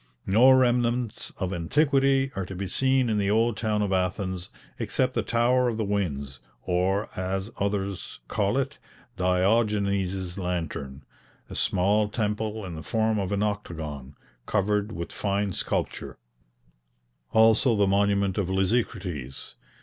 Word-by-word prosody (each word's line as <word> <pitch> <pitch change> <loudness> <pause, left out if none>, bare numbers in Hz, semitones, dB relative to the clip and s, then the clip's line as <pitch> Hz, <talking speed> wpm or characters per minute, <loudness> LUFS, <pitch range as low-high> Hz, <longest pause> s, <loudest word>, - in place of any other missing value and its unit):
No 115 +7 +6
remnants 120 -2 +2
of 95 0 -2
antiquity 135 - +2
are 95 -2 -3
to 95 - -7
be 95 +2 -3
seen 130 +6 +2
in 110 -2 +1
the 100 -1 +1
old 115 +2 +2
town 105 -1 0
of 100 -1 -1
Athens 95 0 -1 0.3
except 125 +3 0
the - - +1
Tower 125 +2 +2
of 115 - -3
the 110 - 0
Winds, 70 -10 -2 0.2
or, 95 +4 +1
as 95 +3 -2
others 100 -1 -2
call - - 0
it, - - -2 0.4
Diogenes' 95 -1 +1
Lantern, 80 -6 -4 0.5
a - - -6
small 105 +3 +2
temple 105 0 -2
in 90 - -6
the 80 - -6
form 110 +3 0
of 95 0 -2
an 100 0 +1
octagon, 80 -10 -4 0.3
covered 105 +1 +1
with 85 -5 -5
fine 100 -1 -1
sculpture; - - -3 1.1
also 110 +2 +5
the 100 -1 +3
monument 100 0 +2
of 95 -3 -1
Lysicrates. 95 - -2
100 Hz, 135 wpm, -26 LUFS, 95-110 Hz, 1.1 s, No